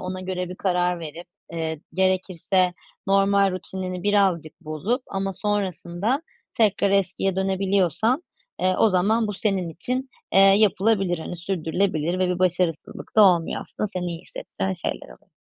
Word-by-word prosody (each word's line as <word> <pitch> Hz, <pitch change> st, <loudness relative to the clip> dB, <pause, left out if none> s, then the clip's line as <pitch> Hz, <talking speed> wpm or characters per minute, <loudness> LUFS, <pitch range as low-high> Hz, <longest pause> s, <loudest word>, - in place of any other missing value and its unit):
ona 185 Hz, 0 st, -5 dB
göre 185 Hz, -1 st, -3 dB
bir 180 Hz, -, -6 dB
karar 180 Hz, -2 st, 0 dB
verip, 165 Hz, +2 st, -8 dB, 0.3 s
eee, 160 Hz, -2 st, -3 dB
gerekirse 185 Hz, 0 st, +1 dB, 0.3 s
normal 195 Hz, 0 st, +3 dB
rutinini 185 Hz, 0 st, -5 dB
birazcık 195 Hz, -6 st, +1 dB
bozup 185 Hz, -, -2 dB
ama 195 Hz, 0 st, -2 dB
sonrasında 200 Hz, -, -1 dB, 0.3 s
tekrar 205 Hz, -3 st, +3 dB
eskiye 195 Hz, -1 st, +1 dB
dönebiliyorsan, 195 Hz, -, +1 dB, 0.4 s
eee, 185 Hz, 0 st, +2 dB
o 225 Hz, -, +5 dB
zaman 210 Hz, +4 st, +2 dB
bu 210 Hz, -, -3 dB
senin 195 Hz, -3 st, -1 dB
için, 250 Hz, -, -3 dB, 0.2 s
eee, -, -, +5 dB
yapılabilir, 195 Hz, -2 st, +4 dB
hani, 170 Hz, +2 st, -6 dB
sürdürülebilir 175 Hz, -1 st, -1 dB
ve 185 Hz, -1 st, +2 dB
bir 180 Hz, 0 st, -1 dB
başarısızlık 175 Hz, -1 st, -1 dB
da 215 Hz, -, +8 dB
olmuyor 175 Hz, -4 st, +3 dB
aslında. -, -, -4 dB
Seni 185 Hz, -3 st, -4 dB
iyi 170 Hz, -1 st, -4 dB
hissettiren 190 Hz, +1 st, -5 dB
şeyler 175 Hz, -4 st, -4 dB
oluyor. -, -, -17 dB
185 Hz, 145 wpm, -24 LUFS, 175-200 Hz, 0.4 s, da